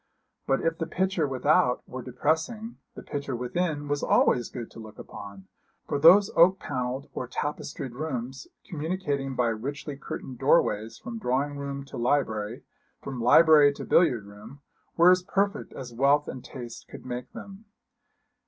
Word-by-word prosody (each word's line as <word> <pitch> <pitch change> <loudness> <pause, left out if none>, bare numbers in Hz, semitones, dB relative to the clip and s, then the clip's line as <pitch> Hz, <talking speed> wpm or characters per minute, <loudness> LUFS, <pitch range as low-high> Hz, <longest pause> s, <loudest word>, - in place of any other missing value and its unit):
But 135 - +2
if 165 0 -1
the 165 - -2
picture 185 -4 0
without 125 -1 +2
were 130 - -6
depressing, 160 - -2 0.2
the - - -9
picture 140 -3 -4
within 145 +4 -2
was 145 0 -1
always 120 - +3
good 120 -3 -7
to - - -12
look 110 -1 -11
upon, 100 -2 -10 0.4
for 145 - -1
those 185 +7 +7
oak 185 +3 +6
panelled 130 -2 -4
or 125 - -4
tapestried 140 -1 -4
rooms, 130 -2 -5 0.2
communicating 145 -5 -3
by 125 -2 +2
richly 140 +6 -5
curtained 130 -2 -7
doorways 115 -6 +2
from 235 -3 -7
drawing 140 - -1
room 140 -1 -5
to - - -9
library, 120 -3 -1 0.4
from 130 -3 -6
library 150 +4 +7
to - - -8
billiard 120 - +3
room, 105 +7 -13 0.4
were 170 +2 +7
as 185 0 +4
perfect 200 +3 -1
as 125 -3 -8
wealth 140 +4 +3
and 130 - -7
taste 120 -3 -9
could - - -11
make 125 0 -6
them. 200 +2 -10
140 Hz, 155 wpm, -27 LUFS, 125-160 Hz, 0.4 s, those